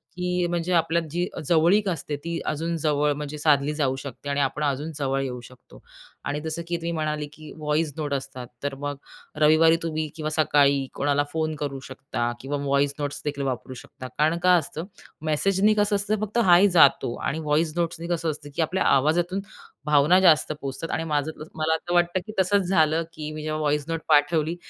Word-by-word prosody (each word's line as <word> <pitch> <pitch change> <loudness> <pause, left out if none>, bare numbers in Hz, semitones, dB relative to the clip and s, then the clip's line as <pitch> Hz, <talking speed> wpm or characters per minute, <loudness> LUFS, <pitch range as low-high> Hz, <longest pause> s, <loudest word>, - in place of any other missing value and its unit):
की 180 0 -1
अ, - - 0
म्हणजे 175 +1 -1
आपल्या 165 0 +2
जी 175 +2 -1 0.2
जवळीक 175 +5 +4
असते, 150 -3 -3
ती 170 +3 -4
अजून 165 +2 -2
जवळ 150 -1 +1
म्हणजे 150 +1 -6
साधली 145 -1 +2
जाऊ 135 -3 0
शकते 135 +1 -8
आणि 140 0 0
आपण 140 +2 -1
अजून 145 +3 -1
जवळ 135 -1 -1
येऊ 125 -2 -4
शकतो 120 - -16 0.4
आणि 145 +1 -2
जसं 160 +1 -4
की 170 - -1
तुम्ही 170 0 -4
म्हणाले, 155 -2 -2
की 155 0 -12
व्हॉईस 150 0 -1
नोट 145 -2 -2
असतात, 135 -2 -5 0.2
तर 145 -1 -2
मग 145 -1 -4 0.4
रविवारी 155 +2 +5
तुम्ही 155 -1 -2
किंवा 155 -1 -3
सकाळी 140 -3 +3
कोणाला 145 0 +1
फोन 155 -1 -1
करू 140 -2 -3
शकता 130 -2 -4
किंवा 145 +2 -3
व्हॉईस 140 +1 +2
नोट्सदेखील 145 0 -3
वापरू 130 0 -3
शकता. 130 0 -10
कारण 155 +3 +2
काय 180 -1 +6
असतं? 160 +3 -6 0.4
मेसेजनी 195 +7 +2
कसं 205 -1 +2
असतं, 205 +2 0
फक्त 215 +2 -3
हाय 180 +3 +7
जातो 140 -8 +4
आणि 155 +3 -3
वॉईस 155 +1 +1
नोट्सनी 170 0 -3
कसं 170 -2 -1
असतं 145 -1 -9
की - - 0
आपल्या 180 +4 0
आवाजातून 170 +7 +2 0.5
भावना 150 +5 +5
जास्त 165 -4 +4
पोहोचतात 140 +1 -5
आणि 160 - -1
माझं 150 -1 -1 0.2
मला 160 +1 +1
असं 175 +2 -5
वाटतं, 175 +1 +2
की 215 - -7
तसंच 190 0 +2
झालं 160 -2 +3
की 155 0 -6
मी 155 0 -6
जेव्हा 155 0 -2
व्हॉईस 150 -1 0
नोट 165 -1 -3
पाठवली 155 +2 +3
155 Hz, 190 wpm, -25 LUFS, 145-170 Hz, 0.5 s, हाय